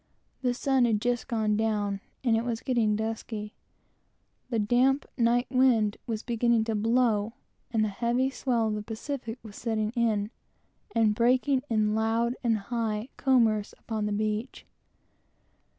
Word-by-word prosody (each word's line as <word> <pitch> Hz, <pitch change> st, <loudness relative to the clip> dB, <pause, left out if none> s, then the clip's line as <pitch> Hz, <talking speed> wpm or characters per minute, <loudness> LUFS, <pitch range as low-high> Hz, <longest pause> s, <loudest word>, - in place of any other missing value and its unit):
The 250 Hz, -2 st, 0 dB
sun 265 Hz, -1 st, +2 dB
had 220 Hz, -3 st, +2 dB
just 240 Hz, +1 st, -1 dB
gone 220 Hz, -4 st, +1 dB
down; 205 Hz, -2 st, 0 dB, 0.2 s
it 230 Hz, -2 st, +2 dB
was 235 Hz, -2 st, -3 dB
getting 235 Hz, -5 st, +1 dB
dusky; 220 Hz, -1 st, -4 dB, 1.0 s
the 235 Hz, -, -1 dB
damp 245 Hz, +6 st, +2 dB
night 240 Hz, +1 st, +2 dB
wind 245 Hz, -5 st, +3 dB
was 225 Hz, -2 st, -3 dB
beginning 235 Hz, -1 st, +2 dB
to 225 Hz, 0 st, -2 dB
blow, 225 Hz, 0 st, +1 dB, 0.4 s
and 220 Hz, -2 st, +1 dB
the -, -, +2 dB
heavy 240 Hz, +5 st, 0 dB
swell 240 Hz, -5 st, 0 dB
of -, -, -1 dB
the 210 Hz, -, -3 dB
Pacific 230 Hz, +2 st, -5 dB
was 215 Hz, -2 st, -11 dB
setting 220 Hz, -2 st, -1 dB
in, 220 Hz, -3 st, 0 dB, 0.6 s
and 220 Hz, -2 st, +4 dB
breaking 255 Hz, +4 st, +2 dB
in 215 Hz, -2 st, +2 dB
loud 225 Hz, +2 st, +1 dB
and 230 Hz, -2 st, +2 dB
high 220 Hz, +1 st, -3 dB
"combers" 225 Hz, -6 st, +2 dB
upon 215 Hz, -2 st, -3 dB
the -, -, -2 dB
beach. 215 Hz, +3 st, -2 dB
225 Hz, 145 wpm, -28 LUFS, 215-245 Hz, 1.0 s, and